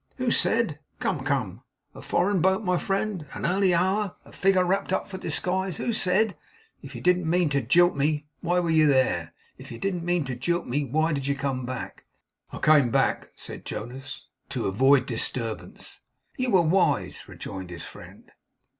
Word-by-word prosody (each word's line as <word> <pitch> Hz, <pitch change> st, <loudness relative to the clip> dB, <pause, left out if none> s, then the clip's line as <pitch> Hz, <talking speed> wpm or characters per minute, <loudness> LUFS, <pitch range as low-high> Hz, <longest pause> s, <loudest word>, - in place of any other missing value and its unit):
'Who 255 Hz, -2 st, 0 dB
said? 225 Hz, -13 st, +1 dB, 0.2 s
Come, 150 Hz, -8 st, -1 dB
come. 125 Hz, -, -1 dB, 0.3 s
A -, -, -11 dB
foreign 185 Hz, 0 st, +1 dB
boat, 190 Hz, +4 st, +2 dB
my 180 Hz, -2 st, +1 dB
friend, 195 Hz, -5 st, -2 dB
an -, -, -4 dB
early 190 Hz, +2 st, +3 dB
hour, 190 Hz, +3 st, +1 dB
a -, -, -15 dB
figure 190 Hz, -1 st, +2 dB
wrapped 190 Hz, +1 st, 0 dB
up 190 Hz, -, 0 dB
for 190 Hz, -2 st, -7 dB
disguise! 185 Hz, -1 st, -1 dB
Who 235 Hz, -, -1 dB
said? 200 Hz, +1 st, +2 dB, 0.5 s
If -, -, -10 dB
you -, -, -6 dB
didn't 180 Hz, -2 st, +2 dB
mean 175 Hz, -1 st, +2 dB
to 140 Hz, -1 st, +1 dB
jilt 175 Hz, +9 st, +4 dB
me, 150 Hz, +1 st, 0 dB
why 175 Hz, +1 st, +1 dB
were 170 Hz, -2 st, 0 dB
you 155 Hz, -1 st, +5 dB
there? 85 Hz, -, +1 dB, 0.2 s
If -, -, -11 dB
you 115 Hz, -, -6 dB
didn't 180 Hz, +4 st, -2 dB
mean 175 Hz, -1 st, +1 dB
to 130 Hz, -1 st, -4 dB
jilt 170 Hz, +8 st, -1 dB
me, 145 Hz, +4 st, -1 dB
why 155 Hz, +5 st, +1 dB
did 140 Hz, -2 st, -2 dB
you 140 Hz, -, +1 dB
come 135 Hz, -3 st, -3 dB
back?' 130 Hz, 0 st, -6 dB, 0.5 s
'I -, -, -6 dB
came 150 Hz, -5 st, +5 dB
back,' -, -, +1 dB
said -, -, -8 dB
Jonas, 125 Hz, +5 st, -7 dB, 0.2 s
'to -, -, -3 dB
avoid 135 Hz, +8 st, +4 dB
disturbance.' 115 Hz, -1 st, -3 dB, 0.3 s
'You 255 Hz, -1 st, -1 dB
were 190 Hz, -6 st, +5 dB
wise,' 180 Hz, +4 st, +1 dB
rejoined 95 Hz, -2 st, -7 dB
his 85 Hz, -2 st, -7 dB
friend. -, -, -12 dB
165 Hz, 180 wpm, -26 LUFS, 135-185 Hz, 0.5 s, you